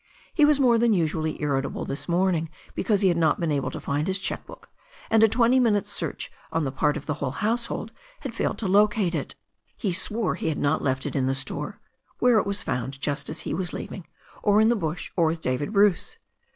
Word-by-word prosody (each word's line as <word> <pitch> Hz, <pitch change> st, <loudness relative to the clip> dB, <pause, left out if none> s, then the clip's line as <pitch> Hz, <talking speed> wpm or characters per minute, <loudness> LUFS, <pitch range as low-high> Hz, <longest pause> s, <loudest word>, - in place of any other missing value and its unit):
He 300 Hz, -, +5 dB
was 295 Hz, -1 st, +4 dB
more 240 Hz, -4 st, +4 dB
than 230 Hz, -2 st, +4 dB
usually 160 Hz, -2 st, -1 dB
ir 140 Hz, -3 st, +1 dB
ritable -, -, -5 dB
this 140 Hz, -, -5 dB
morning 170 Hz, -2 st, +1 dB, 0.2 s
because 205 Hz, 0 st, +1 dB
he 195 Hz, -, +4 dB
had 170 Hz, -, +1 dB
not 160 Hz, -2 st, +2 dB
been 170 Hz, -2 st, 0 dB
able 140 Hz, -2 st, 0 dB
to -, -, -6 dB
find 145 Hz, +2 st, -1 dB
his 190 Hz, 0 st, +1 dB
cheque 195 Hz, -, -3 dB
book, -, -, -13 dB, 0.4 s
and 225 Hz, -1 st, +5 dB
a 220 Hz, -, +8 dB
twenty 235 Hz, +3 st, +3 dB
minutes' 210 Hz, -4 st, +2 dB
search 165 Hz, -6 st, -3 dB, 0.2 s
on 165 Hz, -1 st, 0 dB
the 135 Hz, -, -1 dB
part 145 Hz, +2 st, +1 dB
of -, -, -8 dB
the 150 Hz, -, -1 dB
whole 140 Hz, -2 st, -3 dB
household 225 Hz, -, -2 dB, 0.3 s
had -, -, -5 dB
failed -, -, -1 dB
to 215 Hz, -, -3 dB
locate 205 Hz, -1 st, +3 dB
it. -, -, -3 dB, 0.4 s
He 195 Hz, -6 st, -1 dB
swore 210 Hz, +3 st, -1 dB
he -, -, -2 dB
had 155 Hz, -, -2 dB
not 145 Hz, +2 st, +1 dB
left 130 Hz, -1 st, -1 dB
it -, -, -4 dB
in 130 Hz, -2 st, +1 dB
the 135 Hz, -, +1 dB
store 145 Hz, +8 st, -4 dB, 0.2 s
— -, -, -39 dB
^where 245 Hz, -3 st, +5 dB
it 200 Hz, -, -2 dB
was 200 Hz, 0 st, 0 dB
found 130 Hz, +2 st, -3 dB
just 145 Hz, 0 st, -2 dB
as 155 Hz, -, -4 dB
he -, -, -4 dB
was 180 Hz, -1 st, -2 dB
leaving 180 Hz, -, -7 dB, 0.2 s
— -, -, -23 dB
or 205 Hz, 0 st, +4 dB
in 220 Hz, +1 st, +5 dB
the 240 Hz, -, +3 dB
bush, 165 Hz, -4 st, -3 dB
or 170 Hz, -3 st, +3 dB
with 165 Hz, +1 st, -1 dB
David 130 Hz, +6 st, -1 dB
Bruce. 205 Hz, -, +2 dB
180 Hz, 240 wpm, -25 LUFS, 150-215 Hz, 0.4 s, a